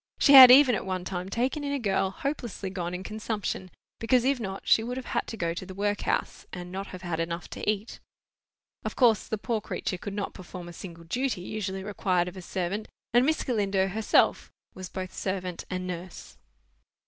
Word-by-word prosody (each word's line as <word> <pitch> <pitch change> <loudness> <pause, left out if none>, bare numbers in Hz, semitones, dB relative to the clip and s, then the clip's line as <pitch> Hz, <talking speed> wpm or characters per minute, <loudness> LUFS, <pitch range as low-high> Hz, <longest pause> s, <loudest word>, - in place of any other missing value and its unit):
She 285 - +5
had 260 -2 +13
even 260 0 +8
at 210 - -1
one 185 -1 -3
time 185 0 -4
taken 255 +8 -1
in 285 - -2
a 285 - 0
girl 195 -5 +1
hopelessly 235 -4 -4
gone 180 -2 -3
in 185 - -6
consumption, 210 -3 -4 0.3
because 245 +2 +2
if 270 -1 +2
not 195 -3 -5
she 220 - +5
would 245 +2 -4
have 260 - -5
had - - -2
to 225 - -6
go 170 -3 -1
to 175 - -6
the 190 0 -9
workhouse, 205 +1 -1
and 180 -1 -7
not 195 +2 -5
have 185 0 -9
had 170 -2 -3
enough 170 +1 -3
to - - -3
eat. 215 +1 -2 0.8
Of - - -4
course 230 -6 +4
the 220 - -2
poor 220 +1 -2
creature 185 -2 -4
could 200 +1 -6
not 205 -1 -3
perform 180 -1 -9
a 175 - -9
single 170 -1 -9
duty 240 +4 -2
usually 190 -1 -4
required 185 -3 0
of 180 - -7
a 185 - -7
servant, 185 +4 -3 0.3
and 245 +3 +5
Miss 315 - +1
Galindo 200 -5 +1
herself 215 +3 +2 0.2
was 185 -1 -8
both 185 -1 -6
servant 185 -2 -4
and 185 -1 -3
nurse. 180 0 -7
195 Hz, 205 wpm, -27 LUFS, 185-225 Hz, 0.8 s, had